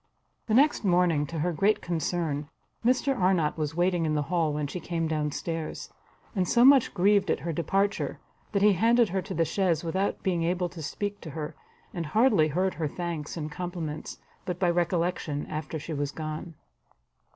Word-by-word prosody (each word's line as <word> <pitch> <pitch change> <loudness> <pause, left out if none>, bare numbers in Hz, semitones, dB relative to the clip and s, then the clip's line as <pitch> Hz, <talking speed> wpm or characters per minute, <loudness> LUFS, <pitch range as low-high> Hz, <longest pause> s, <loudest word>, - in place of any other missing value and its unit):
The 220 - +2
next 290 +1 +4
morning, 175 -6 +3
to 165 - -6
her 170 +3 0
great 200 +7 +2
concern, 160 -3 -2 0.3
Mr 255 +3 +2
Arnott 180 -6 +2
was 155 -1 -3
waiting 175 0 +2
in 155 -1 0
the 150 - +1
hall 165 -3 +2
when 150 0 -2
she 160 +6 -5
came 165 -1 -2
down 150 -2 -1
stairs, 165 +1 -5 0.4
and 185 -2 +1
so 240 +6 +5
much 270 -2 +6
grieved 200 0 +3
at - - +1
her 170 0 -3
departure, 195 +5 0 0.3
that 200 -2 +1
he 210 -1 +6
handed 230 +4 +4
her 190 +1 -1
to - - -6
the 165 +1 +2
chaise 175 -3 0
without 190 +4 -1
being 180 -3 +1
able 175 +1 0
to 170 -1 -9
speak 205 +6 -4
to 160 - -7
her, 150 0 -5 0.4
and 170 -4 -3
hardly 215 -4 +4
heard 185 +5 0
her 155 0 -2
thanks 170 -1 -4
and 155 -1 -4
compliments 170 -3 -5 0.3
but 180 -2 -3
by 180 -2 +2
recollection 170 -3 -1
after 155 +1 -4
she 155 +2 -6
was 145 -1 -2
gone. 155 +2 -6
170 Hz, 185 wpm, -28 LUFS, 155-190 Hz, 0.4 s, much